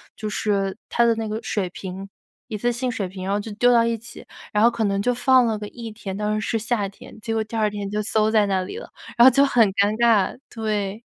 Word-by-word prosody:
就 215 Hz, -, -5 dB
是 200 Hz, -2 st, -1 dB
它 235 Hz, -, +2 dB
的 230 Hz, -1 st, +3 dB
那 225 Hz, 0 st, -3 dB
个 215 Hz, +1 st, -3 dB
水 205 Hz, -4 st, -2 dB
瓶 190 Hz, +1 st, -7 dB, 0.4 s
一 215 Hz, -, -4 dB
次 240 Hz, +4 st, 0 dB
性 245 Hz, +1 st, -2 dB
水 205 Hz, -5 st, -3 dB
瓶， 185 Hz, 0 st, -8 dB
然 195 Hz, -, -2 dB
后 205 Hz, -, +1 dB
就 215 Hz, +1 st, -7 dB
丢 245 Hz, +4 st, +3 dB
到 235 Hz, -1 st, +5 dB
一 230 Hz, 0 st, 0 dB
起。 235 Hz, +2 st, -12 dB, 0.3 s
然 210 Hz, 0 st, +2 dB
后 235 Hz, -, +7 dB
可 235 Hz, -1 st, -2 dB
能 200 Hz, -1 st, 0 dB
就 245 Hz, -, +1 dB
放 255 Hz, 0 st, +4 dB
了 225 Hz, -2 st, 0 dB
个 210 Hz, 0 st, -6 dB
1 230 Hz, +1 st, -8 dB
天， 205 Hz, -3 st, -7 dB
当 210 Hz, +1 st, -1 dB
时 215 Hz, -, -4 dB
是 225 Hz, -, 0 dB
夏 220 Hz, -2 st, -1 dB
天， 200 Hz, +2 st, -14 dB
结 225 Hz, +1 st, -4 dB
果 220 Hz, -1 st, 0 dB
第 220 Hz, +1 st, -9 dB
2 215 Hz, -1 st, +2 dB
天 205 Hz, -1 st, -5 dB
就 210 Hz, +1 st, -2 dB
馊 215 Hz, 0 st, +2 dB
在 215 Hz, -2 st, +3 dB
那 190 Hz, -2 st, 0 dB
里 185 Hz, -, -6 dB
了。 485 Hz, -, -9 dB, 0.3 s
然 235 Hz, -, +8 dB
后 -, -, +11 dB
就 275 Hz, +2 st, +4 dB
很 240 Hz, -5 st, +4 dB
尴 200 Hz, +1 st, +2 dB
尬， 225 Hz, -4 st, +3 dB
对。 215 Hz, -2 st, -3 dB
215 Hz, 275 characters per minute, -23 LUFS, 205-235 Hz, 0.4 s, 后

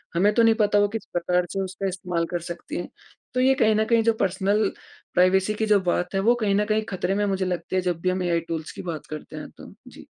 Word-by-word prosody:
हमें 200 Hz, +5 st, +3 dB
तो 230 Hz, -, +4 dB
नहीं 225 Hz, 0 st, +5 dB
पता 205 Hz, -1 st, +3 dB
वो 205 Hz, -, +4 dB
किस 225 Hz, -, -4 dB
प्रकार 180 Hz, +1 st, +1 dB
से 195 Hz, -, -1 dB
उसका 190 Hz, +1 st, -4 dB
इस्तेमाल 180 Hz, -2 st, -2 dB
कर 175 Hz, -, -1 dB
सकती 170 Hz, -, -6 dB
हैं। 175 Hz, -, -5 dB, 0.4 s
तो 255 Hz, -, 0 dB
ये 265 Hz, +1 st, +5 dB
कहना 220 Hz, -3 st, +3 dB
कहीं 230 Hz, 0 st, +3 dB
जो 230 Hz, 0 st, +3 dB
पर्सनल 195 Hz, +2 st, +1 dB, 0.4 s
प्राइवेसी 190 Hz, +3 st, +3 dB
की 220 Hz, +1 st, -1 dB
जो 210 Hz, -1 st, +4 dB
बात 180 Hz, 0 st, -1 dB
है, -, -, +2 dB
वो 230 Hz, +5 st, +4 dB
कहीं 210 Hz, -4 st, 0 dB
न 210 Hz, +1 st, +2 dB
कहीं 215 Hz, 0 st, +1 dB
खतरे 185 Hz, 0 st, -1 dB
में 205 Hz, 0 st, +1 dB
मुझे 190 Hz, -1 st, 0 dB
लगती 180 Hz, 0 st, -3 dB
है 185 Hz, -, +2 dB
जब 180 Hz, -2 st, -2 dB
भी 185 Hz, -, +1 dB
हम 185 Hz, 0 st, -1 dB
एआई 170 Hz, -1 st, +1 dB
टूल्स 160 Hz, -1 st, -4 dB
की -, -, -8 dB
बात 155 Hz, -, -7 dB
करते 155 Hz, -1 st, -8 dB
हैं -, -, -7 dB
तो। -, -, -12 dB
जी। -, -, -13 dB
195 Hz, 260 wpm, -24 LUFS, 180-215 Hz, 0.4 s, नहीं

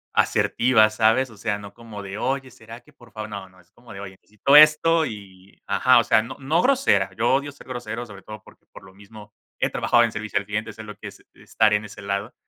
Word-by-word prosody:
Asertiva, 115 Hz, -3 st, +3 dB
¿sabes? 115 Hz, +4 st, +2 dB
O 110 Hz, -, -16 dB
sea, 105 Hz, 0 st, -2 dB
no 100 Hz, -1 st, -11 dB
como 110 Hz, -3 st, -10 dB
de: 100 Hz, +1 st, -7 dB
"oye, 130 Hz, +2 st, -3 dB
será 115 Hz, +1 st, -13 dB
que 150 Hz, -, -23 dB
por 120 Hz, -5 st, -20 dB
favor", 110 Hz, 0 st, -7 dB
no 100 Hz, -2 st, -7 dB
no, 95 Hz, -1 st, -22 dB
es 90 Hz, -, -31 dB
como 120 Hz, +2 st, -15 dB
de: 100 Hz, -, -9 dB
"oye, 95 Hz, -1 st, -10 dB
necesito 120 Hz, +7 st, +3 dB
esto" 155 Hz, +2 st, +5 dB
y 100 Hz, -4 st, -11 dB
ajá, -, -, +4 dB
o -, -, +2 dB
sea, -, -, +3 dB
no 115 Hz, +4 st, -8 dB
no 155 Hz, +6 st, 0 dB
grosera, 270 Hz, +1 st, +2 dB
yo 120 Hz, +3 st, +2 dB
odio 140 Hz, +2 st, 0 dB
ser 145 Hz, -, -16 dB
grosero, 120 Hz, -2 st, -6 dB
sobre 100 Hz, -4 st, -13 dB
todo, 110 Hz, +1 st, -11 dB
porque, -, -, -20 dB
por -, -, -13 dB
lo 95 Hz, -, -16 dB
mismo 105 Hz, +1 st, -15 dB, 0.2 s
he -, -, 0 dB
trabajado 120 Hz, -, +2 dB
en 115 Hz, -, 0 dB
servicio 110 Hz, -2 st, -4 dB
al 100 Hz, -, -2 dB
cliente, 105 Hz, +2 st, -4 dB
sé 110 Hz, -, -10 dB
lo 105 Hz, -1 st, -10 dB
que -, -, -9 dB
es -, -, -13 dB
estar 110 Hz, -1 st, 0 dB
en 105 Hz, 0 st, 0 dB
ese 100 Hz, -, -11 dB
lado, 100 Hz, +4 st, -4 dB
110 Hz, 245 wpm, -23 LUFS, 100-125 Hz, 0.2 s, esto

